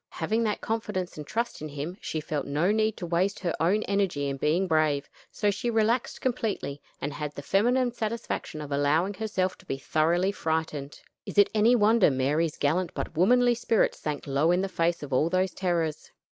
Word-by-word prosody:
Having 220 +2 0
that 210 - -1
confidence 210 -5 -3
and 150 -1 -8
trust 235 -4 -2
in 155 - -5
him, 145 +5 -5
she 160 - -3
felt 150 -1 -3
no 150 +7 +1
need 215 0 +1
to 175 - -5
waste 180 +4 0
her 175 -3 -1
own 195 +6 +2
energy 195 -8 0
in 135 0 -3
being 155 +7 +1
brave; 155 -3 +1 0.2
so 205 -1 0
she 240 +4 -2
relaxed 230 +2 +1
completely, 215 - -2 0.2
and 145 +1 -3
had 150 0 -5
the 145 - -7
feminine 245 - +2
satisfaction 220 -8 -4
of 145 -1 -7
allowing 150 +7 +2
herself 190 -3 -2
to 190 - -18
be 135 - -2
thoroughly 170 +7 +1
frightened. 160 -5 -3 0.3
Is - - -7
it 205 - +6
any 220 +3 +5
wonder 220 -3 +5
Mary's 145 +4 0
gallant 170 +5 0
but - - -4
womanly 245 +8 +4
spirit 230 -1 +1
sank 150 -2 -5
low 140 +3 +1
in 180 +1 +3
the 195 - -1
face 170 -2 0
of 140 -2 -6
all 150 +6 +3
those 185 +1 +1
terrors? 170 -4 -1
175 Hz, 195 wpm, -27 LUFS, 150-210 Hz, 0.3 s, it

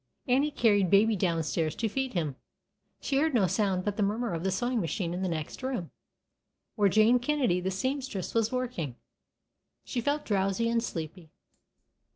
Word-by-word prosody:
Annie 270 +4 +3
had 290 - -20
carried 205 -5 +4
Baby 210 +3 +5
down 170 -4 0
stairs 155 0 -1
to 230 - -1
feed 265 +4 -2
him. 155 -7 -1 0.7
She 275 - 0
heard 310 -2 +1
no 210 -5 +4
sound 190 0 0
but 205 -1 -2
the - - 0
murmur 210 +1 0
of 165 0 -3
the 190 - +1
sewing 240 +5 0
machine 170 0 -2
in 180 - -3
the 190 - 0
next 155 - -4
room, 255 -10 -3 0.8
where 205 -3 +3
Jane 220 +5 +5
Kennedy, 245 -9 +1
the 185 - -1
seamstress, 260 0 -3
was 225 -1 +1
working. 245 - -3 0.9
She 245 - -2
felt 290 +4 -1
drowsy 195 +2 +1
and 230 0 +2
sleepy. 165 -3 -6
205 Hz, 180 wpm, -29 LUFS, 180-245 Hz, 0.9 s, Baby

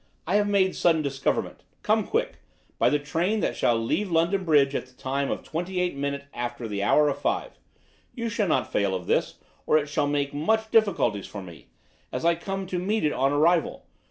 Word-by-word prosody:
I 185 +5 +2
have 205 0 +2
make 190 -2 +3
sudden 160 -3 +2
discoverment. 140 -1 -2 0.2
Come - - +2
quick, - - -1 0.4
by - - +4
the 150 - +2
train 165 +9 -1
that - - -1
shall 120 - +2
leave 150 - -1
London 170 +4 +1
Bridge 145 -4 +4
at 125 - -3
the 125 - -23
time 135 +2 -2
of - - -3
twenty 180 +3 -3
eight 180 -4 0
minute 140 0 -3
after 120 -1 -4
the 100 -2 -3
hour 150 +9 +4
of 140 -1 -1
five. - - -2 0.6
You 235 -2 -3
shall 220 -2 0
not 155 - 0
fail 100 -2 +1
of 90 -1 -5
this, - - 0 0.3
or 155 - +5
it 150 -1 -1
shall 145 0 0
make 145 -1 -1
much 220 +9 0
difficulties 195 - +2
for 100 -2 -8
me, 85 -4 -13 0.4
as - - -3
I 170 - +5
come 195 +3 -4
to 185 -1 -3
meet 210 +5 -1
it 150 - +1
on 135 +2 +1
arrival. 160 +3 +2
150 Hz, 210 wpm, -26 LUFS, 135-185 Hz, 0.6 s, or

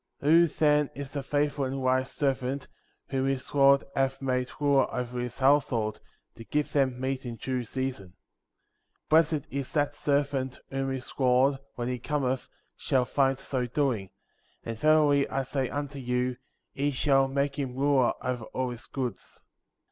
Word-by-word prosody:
49. 160 +4 +5
Who, 170 - +4
then, 150 -2 +2
is 140 +1 -7
a 140 - -1
faithful 145 +1 0
and 135 +1 -3
wise 130 0 +1
servant^ 135 -1 -1 0.4
whom 135 0 0
his 135 -1 -2
lord 140 -1 +5
hath 135 0 +1
made 125 -1 -1
ruler 140 -2 +3
over 125 -1 -3
his 120 -1 -4
household, 130 -5 +2 0.3
to 115 - -11
give 150 +5 -2
them 130 -3 +1
meat 130 0 -2
in 120 -2 -5
due 130 +1 -3
season? 115 -7 -4 0.8
50. - - -45
Blessed 155 -2 +3
is 140 -1 -3
that 145 -1 +1
servant 140 -3 0
whom 135 0 -1
his 130 -1 -5
lord, 130 +1 +3 0.2
when 120 0 -3
he 125 0 -2
cometh, 130 -1 -1 0.3
shall 130 -2 +1
find 135 +1 +2
so 130 -2 -2
doing; 120 -7 0 0.5
and 115 -1 -5
verily 150 -2 +4
I 135 - -1
say 135 0 -2
unto 145 -1 -4
you, 125 0 -1 0.4
he 145 +1 0
shall 135 -1 +3
make 140 +2 -1
him 130 -3 -3
ruler 135 -2 +3
over 125 -3 -2
all 130 +1 -3
his 120 -1 -9
goods. 125 -7 -5
135 Hz, 165 wpm, -28 LUFS, 125-140 Hz, 0.8 s, 49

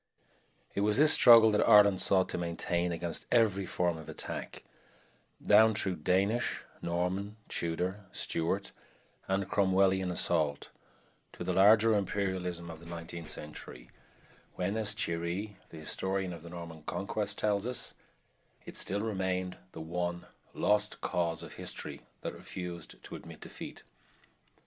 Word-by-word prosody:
It 100 - -1
was 105 +2 +3
this 150 +2 +8
struggle 115 -2 +8
that 105 - +2
Ireland 100 -2 +7
sought 95 -1 +3
to - - -3
maintain 85 +1 -1
against 85 0 -3
every 100 -5 +3
form 85 -2 0
of 80 - -10
attack, - - -5 0.8
down 110 +1 +5
through 95 -3 0
Danish, 100 +9 +1 0.2
Norman, 90 +4 -2
Tudor, 90 +4 -2
Stuart, 90 +4 -1 0.6
and 95 0 0
Cromwellian 95 -1 +2
assault, 80 -5 0 0.6
to - - -6
the 90 +1 -1
larger 110 +4 +6
imperialism 95 -4 -2
of 80 - -10
the 85 - -13
nineteenth 85 -1 -7
century, 65 -5 -9 0.6
when, 95 +3 -1
as 110 -2 0
Thierry, 85 +5 -3
the 80 - -11
historian 95 +4 -2
of 85 - -9
the 85 - -10
Norman 85 -2 -8
Conquest, - - -3
tells 105 +1 0
us, 125 - -2 0.7
it - - -9
still 100 +2 0
remained 95 -4 -2 0.2
the 80 - -8
one 85 +2 -3 0.3
"lost 105 0 +1
cause" 85 -2 -1
of - - -9
history - - -6 0.2
that - - -4
refused 90 -3 -7
to - - -8
admit - - -10
defeat. - - -9
95 Hz, 135 wpm, -31 LUFS, 85-100 Hz, 0.8 s, this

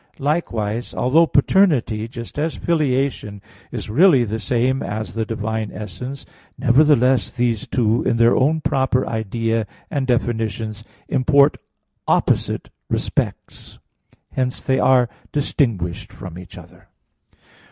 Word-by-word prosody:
Likewise, 120 -7 -2
although 160 +7 +3
paternity, 140 - +2
just 115 +3 -8
as 160 +1 -1
filiation, 135 -9 -1 0.3
is - - -5
really 140 - +5
the 110 0 -3
same 125 +4 0
as 110 +1 -4
the 110 0 -2
divine 110 -1 -3
essence; 110 +7 -7 0.3
nevertheless 130 -1 +4
these 120 -3 -1
two 115 -2 +1
in 115 - 0
their 115 +1 +4
own 155 +4 +2
proper 130 -2 +1
idea 115 0 -1 0.2
and 135 -2 -1
definitions 110 -3 -1 0.2
import 140 +2 +3 0.5
opposite - - 0 0.2
respects. - - -3 0.5
Hence 125 -1 -2
they 130 -1 +2
are 125 -2 +4 0.2
distinguished 105 - -1
from 90 -4 -9
each 90 -3 -12
other. - - -15
120 Hz, 115 wpm, -20 LUFS, 110-135 Hz, 0.5 s, really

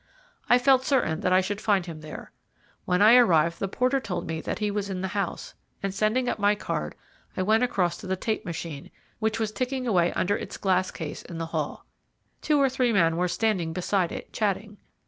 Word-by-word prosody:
I 245 - +7
felt 260 +1 +4
certain 245 - +1
that 185 - 0
I 185 +1 +5
should 200 +2 -4
find 200 -4 +2
him 165 -3 -8
there. 155 0 -9 0.5
When 180 +3 +2
I 225 +4 +8
arrived 170 -8 +4
the 195 - -1
porter 255 +7 +1
told 225 -8 -4
me 160 0 -4
that - - -3
he 210 -1 -1
was 200 -1 -2
in 185 -1 -3
the 190 - -2
house, 200 -2 -3 0.3
and 195 -1 -1
sending 220 +5 +1
up - - -1
my 205 0 +3
card, - - -4 0.4
I 185 - +1
went 220 +4 +3
across 190 -8 +1
to 195 - -9
the 190 - 0
tape 215 +3 -2
machine, 165 -5 -6 0.3
which 220 0 0
was 220 -1 -1
ticking 255 +4 -2
away 175 -7 +2
under 200 +3 +1
its - - -6
glass 185 -2 +1
case 160 -3 -6
in 170 - -9
the 165 - -3
hall. - - -3 0.6
Two 300 -2 +2
or 275 - +5
three 255 -2 +1
men 165 -6 +3
were 180 +2 +1
standing 180 -4 0
beside 180 0 0
it, - - -8
chatting. 210 0 -2
200 Hz, 215 wpm, -26 LUFS, 180-225 Hz, 0.6 s, I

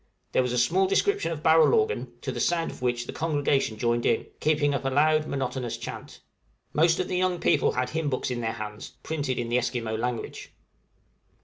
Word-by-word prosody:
There - - +3
was 125 -1 -1
a 125 - -1
small 185 +10 +3
description 405 - +1
of 155 -2 -5
barrel 160 - +6
organ, 445 0 0
to - - -3
the - - -5
sound 170 -1 +1
of - - -13
which 120 -1 0
the - - -7
congregation 145 -7 0
joined 120 +1 0
in, - - +1
keeping 150 -1 +2
up 140 - -2
a 135 - 0
loud 155 +3 +3
monotonous 130 -3 -3
chant. - - -8 0.5
Most 165 +2 +3
of 185 - 0
the 180 - -1
young 180 -1 +1
people - - +2
had 125 - -1
hymn 160 -2 -1
books 130 -1 -2
in 120 -1 -2
their 110 -1 -1
hands, 105 -1 -7
printed 145 -5 -2
in 120 -1 -2
the 120 +1 +3
Esquimaux 120 -2 -2
language. 120 0 -4
135 Hz, 205 wpm, -26 LUFS, 120-160 Hz, 0.5 s, barrel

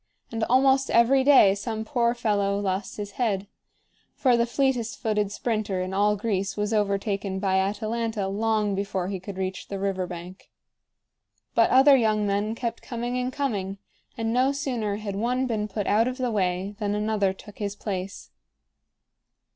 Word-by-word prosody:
And 225 -1 -2
almost 265 +1 +3
every 255 +3 +4
day 260 -8 +7
some 220 +2 -4
poor 235 -1 +1
fellow 200 -4 0
lost 195 0 -2
his 205 -1 -5
head; 200 -5 0 0.7
for 255 -3 +3
the 235 0 +2
fleetest 245 -3 0
footed 210 -3 0
sprinter 215 -4 -2
in 185 +1 -3
all 205 +2 +3
Greece 195 -2 -2
was 210 +1 -1
overtaken 200 -2 0
by 190 -1 +1
Atalanta 215 +1 -1
long 210 +1 0
before 195 -2 -2
he 195 -2 -3
could 190 +1 -8
reach 190 0 -4
the 200 - -4
river 190 -2 -1
bank. 175 +2 -9 1.0
But 230 - +4
other 270 +2 +7
young 215 -4 +2
men 205 +2 0
kept 235 -1 -4
coming 240 0 -4
and 250 +1 -2
coming, 205 -9 -2 0.4
and 225 0 -1
no 255 +2 +3
sooner 245 -7 -2
had 205 -2 -5
one 250 +5 0
been 215 -4 -1
put 210 0 -3
out 220 +3 +3
of 255 0 -3
the 250 -2 -1
way 190 -1 -1
than 205 -1 -1
another 210 -2 +1
took 205 +2 -13
his 205 -1 -3
place. 195 -2 -5
210 Hz, 165 wpm, -26 LUFS, 195-235 Hz, 1.0 s, day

